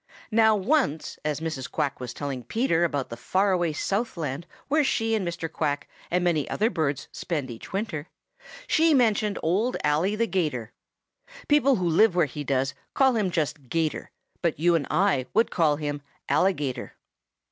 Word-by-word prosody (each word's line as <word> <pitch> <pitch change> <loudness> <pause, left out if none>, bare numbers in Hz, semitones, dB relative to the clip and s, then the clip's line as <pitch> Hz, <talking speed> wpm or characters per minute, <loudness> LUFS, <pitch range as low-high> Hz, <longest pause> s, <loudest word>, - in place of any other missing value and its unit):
Now 220 0 +5
once, 205 - 0
as 150 0 -2
Mrs. 155 -5 -4
Quack 140 - -2
was 125 -1 -5
telling 135 0 -4
Peter 175 - +1
about 145 -6 -1
the 115 - -5
far 190 +11 +1
away 175 -3 +1
Southland 170 - -2 0.2
where 305 +2 +3
she 225 -4 +1
and 205 -5 0
Mr. 170 -1 -3
Quack 145 -2 -2 0.2
and 180 +1 +1
many 165 -5 +1
other 220 +3 +1
birds 150 - -1
spend 145 -7 -3
each 115 - -10
winter, 190 -6 -3 0.6
she 325 -7 +4
mentioned 215 -4 +2
Old 205 +10 +1
Ally 155 +8 +2
the 230 +2 +1
'Gator. 150 - -2 0.8
People 285 -2 +4
who 180 -4 -1
live 175 +4 +4
where 175 -3 +4
he 145 +1 -6
does 135 -1 0 0.2
call 265 -1 +4
him 210 -4 +1
just 150 -5 -2
'Gator, 160 0 -1 0.3
but 170 -3 0
you 170 +2 +4
and 160 -4 +1
I 180 -10 +2
would 225 +2 +3
call 155 -4 +3
him 145 -1 -4 0.3
Alligator. 145 -4 0
170 Hz, 170 wpm, -26 LUFS, 145-210 Hz, 0.8 s, Now